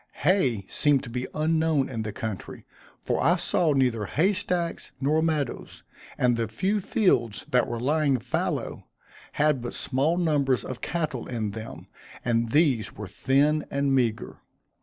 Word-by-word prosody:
Hay 135 - +2
seemed 145 -3 +3
to 120 - -8
be 125 +1 -3
unknown 155 -2 +1
in 115 -4 -4
the 110 -1 -4
country, 110 -1 -6 0.4
for - - 0
I 170 +6 +4
saw 170 -2 +2
neither 125 -6 +1
hay 180 - +2
stacks 180 -4 -1
nor 150 +3 +2
meadows; 155 -5 -2 0.3
and 125 -1 +3
the 115 -1 -1
few 190 - -1
fields 120 - +1
that 125 -1 +3
were 120 - -4
lying 145 +1 +2
fallow, - - -3 0.5
had 150 -3 +2
but 120 - -5
small 140 +6 0
numbers 145 -7 +1
of 130 - -7
cattle 155 -8 -3
in 110 -4 -3
them, 110 +2 -8 0.4
and 115 -1 +1
these 140 -5 +2
were 105 - -7
thin 145 +9 +1
and 140 0 0
meagre. 120 -4 -1
135 Hz, 155 wpm, -26 LUFS, 115-155 Hz, 0.5 s, I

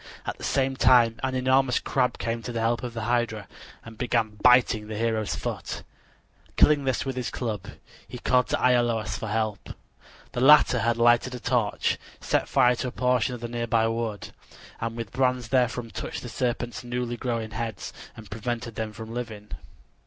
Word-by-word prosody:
At - - -4
the - - -10
same 135 -1 +1
time 120 -3 +5
an 130 -1 -1
enormous 130 0 +3
crab 125 -2 0
came 115 0 -3
to 120 - -6
the 115 - -3
help 115 +1 +1
of 120 -2 -6
the 115 - -3
hydra 115 -3 -1 0.4
and 115 -1 -11
began 115 -4 0
biting 125 -4 +5
the 110 -1 -5
hero's 110 -2 0
foot. - - -5 0.7
Killing 145 -2 +5
this 130 0 0
with 135 -1 -3
his 125 -2 -2
club, 105 -5 -4 0.4
he 125 - -8
called 125 +1 +2
to - - 0
Iolaus 120 -3 +2
for 110 - -5
help. 110 -1 -2 0.6
The 120 - -3
latter 135 -2 +7
had 115 0 +1
lighted 120 +2 +3
a - - -6
torch, 120 -4 0 0.2
set - - 0
fire 125 -2 +4
to 125 - -2
a - - -4
portion 125 -1 +1
of 120 - -10
the 120 - -3
nearby 115 -1 +1
wood, 115 -3 -3 0.5
and 115 0 -3
with 115 -4 -5
brands 125 -3 0
therefrom 125 -2 +1
touched - - -5
the 120 - -6
serpent's 120 0 -2
newly 120 0 -3
growing 115 -3 -3
heads 110 -2 -5 0.2
and 110 -2 -12
prevented 115 +2 -4
them 110 0 -4
from 110 +1 -8
living. 110 -4 -6
120 Hz, 180 wpm, -26 LUFS, 115-125 Hz, 0.7 s, latter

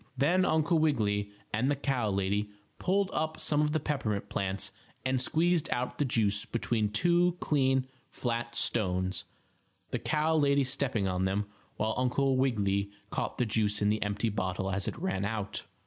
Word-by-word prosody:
Then 175 +8 +3
Uncle 160 0 +2
Wiggily 105 -10 +1 0.2
and 115 +6 +1
the 145 - +2
cow 135 -5 0
lady 100 +1 0 0.3
pulled 195 +1 +1
up 155 0 -1
some 150 0 +2
of 150 0 +2
the 155 - +1
peppermint 120 -9 -2
plants 95 0 -2 0.3
and 130 -1 +2
squeezed 165 +4 +2
out 125 +1 -2
the 145 - +3
juice 105 -5 +2
between 115 -2 0
two 175 +9 +3
clean, 130 -3 +2 0.2
flat 120 -1 -3
stones, 95 -4 0 0.7
the - - -1
cow 155 +1 +1
lady 140 -2 +4
stepping 125 -6 0
on 90 0 0
them 100 +2 0 0.3
while 110 +1 0
Uncle 130 +1 +2
Wiggily 100 -6 +1 0.2
caught - - -2
the 125 - +2
juice 105 -1 0
in 105 - +2
the 110 0 +1
empty 105 +2 0
bottle 95 -2 -2
as 100 +1 -1
it - - -3
ran 95 +1 -1
out. 105 -1 -3
120 Hz, 165 wpm, -30 LUFS, 105-145 Hz, 0.7 s, lady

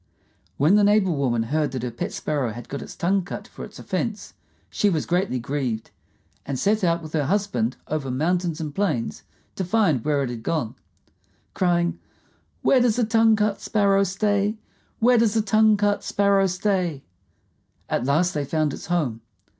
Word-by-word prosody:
When 150 +7 +4
the 210 - +4
neighbor 205 -2 +4
woman 130 -6 0
heard 145 +3 -1
that 130 -2 -4
her 125 - -3
pet 115 - -4
Sparrow 140 -7 -2
had 120 +1 -9
got 140 - -5
its - - -9
tongue 195 +2 +1
cut 180 - -7
for - - -10
its - - -10
offense, - - -4 0.4
she 205 - +2
was 160 -6 -1
greatly 175 -5 0
grieved, 125 -3 -3 0.5
and 140 -2 -4
set 210 - +1
out 170 -1 +1
with 155 - -9
her 150 -3 +1
husband 175 - 0
over 150 -3 -3
mountains 170 +5 0
and 155 -3 -4
plains 145 - -1 0.3
to 190 - -2
find 180 - +2
where 145 -2 +1
it 125 - -3
had 120 -2 -6
gone, 120 -3 -2 0.8
crying, 175 -2 +1 0.6
"Where 260 - +4
does 240 -3 +3
the 245 - +2
tongue 225 0 +4
cut 210 -1 0
Sparrow 200 -2 +2
stay? 205 +2 0 0.4
Where 245 +1 +4
does 225 -1 +2
the 220 - +3
tongue 215 +1 +4
cut 205 0 +1
Sparrow 200 -1 +2
stay?" 180 -5 -1 0.8
At 120 - -1
last 165 +7 +2
they 150 - -1
found 155 0 0
its - - -8
home. 150 -10 -1
175 Hz, 180 wpm, -24 LUFS, 140-205 Hz, 0.8 s, When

